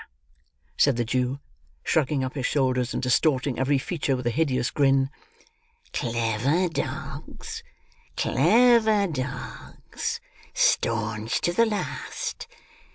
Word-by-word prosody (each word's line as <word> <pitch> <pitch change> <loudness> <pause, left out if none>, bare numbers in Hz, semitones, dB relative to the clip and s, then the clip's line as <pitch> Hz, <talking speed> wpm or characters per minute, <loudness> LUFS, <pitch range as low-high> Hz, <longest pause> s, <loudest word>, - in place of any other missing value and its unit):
said 140 -3 +4
the 120 0 0
Jew, 125 +3 -1 0.4
shrugging 145 -3 +1
up 130 - -3
his 135 -4 -1
shoulders, 130 -3 +1
and - - -3
distorting 130 0 +2
every 135 +2 +2
feature 140 -1 -1
with 125 -1 -5
a 120 - +2
hideous 130 -3 0
grin. 135 -1 +3 0.8
"Clever 120 +8 +1
dogs! 140 -1 -5 0.6
Clever 220 - +4
dogs! 130 -6 -5 0.4
Staunch 110 -1 +1
to 175 - +1
the 230 +4 +4
last! 220 - -4
135 Hz, 105 wpm, -25 LUFS, 125-160 Hz, 0.8 s, said